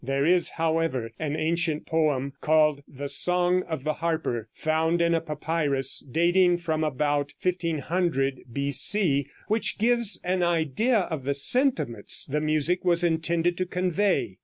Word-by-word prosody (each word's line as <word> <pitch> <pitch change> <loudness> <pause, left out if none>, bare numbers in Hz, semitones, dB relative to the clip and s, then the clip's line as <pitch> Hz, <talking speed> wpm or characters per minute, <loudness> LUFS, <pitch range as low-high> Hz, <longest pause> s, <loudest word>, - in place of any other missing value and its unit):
There 135 +2 -1
is, 175 +1 +3
however, 160 -8 -1
an 150 -1 -3
ancient 160 -1 -1
poem, 145 -4 0
called 150 -2 +2
"The 140 +1 -7
Song 180 +5 +3
of 160 -5 -4
the 155 +1 -1
Harper" 155 -9 -3
found 160 +2 0
in 170 0 +2
a 165 - +1
papyrus 150 -4 0
dating 175 +5 +2
from 160 -2 -2
about 145 0 -1
1500 165 -5 -1
B.C., 140 - +1 0.2
which 220 +1 0
gives 235 -1 +2
an 180 +1 -1
idea 175 - +1
of 160 -6 -5
the 140 +1 -1
sentiments 150 - +1
the 150 +2 -2
music 155 +3 0
was 175 -1 +2
intended 170 +1 0
to 185 - -1
convey. 180 - -1
160 Hz, 140 wpm, -25 LUFS, 140-175 Hz, 0.2 s, is